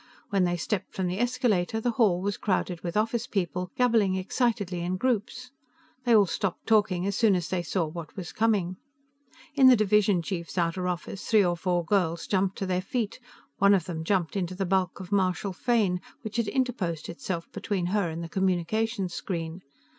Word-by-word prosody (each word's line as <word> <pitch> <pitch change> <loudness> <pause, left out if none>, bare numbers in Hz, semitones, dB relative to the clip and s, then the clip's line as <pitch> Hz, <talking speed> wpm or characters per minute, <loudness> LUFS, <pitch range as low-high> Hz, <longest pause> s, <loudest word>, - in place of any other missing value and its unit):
When 195 -2 +3
they 175 0 0
stepped 195 +4 -3
from 190 - -1
the 180 +2 -2
escalator, 225 -5 +1
the 240 +2 0
hall 210 -6 +2
was 200 0 -1
crowded 185 -3 -1
with 175 +2 -3
office 225 +2 0
people, 180 -4 -2
gabbling 225 -6 +3
excitedly 200 -1 -1
in 180 +2 -2
groups; 250 +2 -1 0.5
they 240 -2 +5
all 205 -2 +6
stopped 185 +1 -3
talking 200 -5 +2
as 200 -1 -1
soon 215 -3 +4
as 175 -2 -2
they 185 -2 0
saw 170 +2 -1
what 160 0 -8
was 180 -4 -5
coming. 200 -5 +1 0.8
In 275 -3 +6
the 255 - +9
division 210 -4 +3
chief's 175 -1 -5
outer 175 +1 0
office 180 +2 -4
three 215 -3 +5
or 175 -1 +1
four 175 -1 0
girls 170 -3 +1
jumped 190 -1 0
to 195 - -2
their 185 -1 0
feet; 225 +3 -3 0.4
one 200 +1 +6
of 180 -4 0
them 160 -3 -4
jumped 180 -1 0
into 185 -2 -2
the 195 +1 -1
bulk 185 0 0
of 185 -2 -9
Marshal 190 0 +1
Fane, 195 -4 +1 0.2
which 220 0 -5
had 230 -2 +1
interposed 220 - -1
itself 170 0 -5
between 195 -5 -2
her 200 -5 +1
and 165 +1 -5
the - - -5
communication 190 +4 0
screen. 170 -1 -4
190 Hz, 190 wpm, -27 LUFS, 175-215 Hz, 0.8 s, the